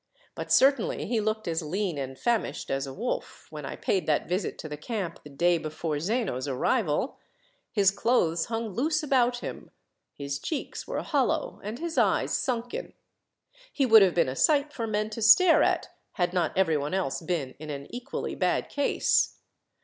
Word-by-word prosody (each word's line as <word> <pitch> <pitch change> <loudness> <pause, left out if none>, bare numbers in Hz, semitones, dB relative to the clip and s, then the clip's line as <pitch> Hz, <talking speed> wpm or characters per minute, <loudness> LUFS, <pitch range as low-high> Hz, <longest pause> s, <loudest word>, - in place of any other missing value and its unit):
But - - -6
certainly 270 -3 +3
he 230 0 0
looked 215 0 -2
as 165 0 0
lean 175 0 -2
and 135 -1 -5
famished 235 - -1
as 135 0 -1
a - - -6
wolf, 245 +3 -4
when - - -6
I - - -5
paid 190 - -1
that 150 -2 +1
visit 180 +1 -2
to - - -7
the 150 - -5
camp 190 +3 -4
the 150 - -11
day 170 +4 +2
before 155 -1 -3
Zeno's 180 - -1
arrival. 155 - 0 0.5
His 200 -4 +4
clothes 175 -6 +1
hung 225 -1 -3
loose 305 - 0
about 245 -4 +2
him, - - -7 0.5
his 140 -1 -4
cheeks 305 - -4
were - - -3
hollow, - - 0
and 215 +3 -5
his 335 +2 -2
eyes - - +2
sunken. 245 -4 -3 0.8
He 275 - +1
would 220 -3 +8
have 190 -3 +4
been 170 - +3
a 130 - -3
sight 295 - +2
for 230 -2 -3
men 215 0 -1
to 230 - -5
stare 325 - +7
at, - - +1 0.2
had 175 -3 0
not 175 -2 0
every 165 -5 +3
one 145 +5 -2
else 180 -7 -1
been 160 -6 -2
in 155 0 -8
an 140 -1 -5
equally 250 +3 -4
bad - - 0
case. 285 -1 +1
195 Hz, 180 wpm, -27 LUFS, 155-240 Hz, 0.8 s, would